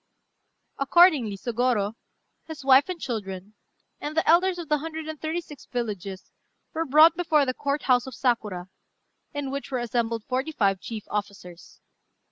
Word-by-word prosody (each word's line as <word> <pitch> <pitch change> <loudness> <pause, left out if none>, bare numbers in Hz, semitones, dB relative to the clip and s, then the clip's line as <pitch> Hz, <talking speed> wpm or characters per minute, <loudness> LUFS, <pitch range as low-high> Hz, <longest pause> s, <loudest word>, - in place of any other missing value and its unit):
Accordingly 275 - +4
Sôgorô, 235 -2 0 0.5
his 310 -4 -8
wife 275 +4 +6
and 360 -2 -4
children, 205 -6 -5 0.5
and 300 +2 -5
the 320 - +2
elders 360 +3 +4
of 340 -2 -6
the 300 0 +1
hundred 320 +1 -6
and 315 -2 -7
thirty 320 +2 -2
six 295 -4 -13
villages 205 -6 -5 0.4
were 325 +1 -1
brought 310 +3 +6
before 315 -4 +2
the 255 - -1
Court 280 +1 -2
house 250 -1 +3
of 260 - -8
Sakura, 210 -9 -1 0.6
in 285 -2 -4
which 280 0 -5
were 260 - -1
assembled 235 -2 -1
forty 265 +6 -2
five 195 -7 +1
chief 220 +1 -7
officers. 200 -4 -6
260 Hz, 155 wpm, -26 LUFS, 215-310 Hz, 0.6 s, wife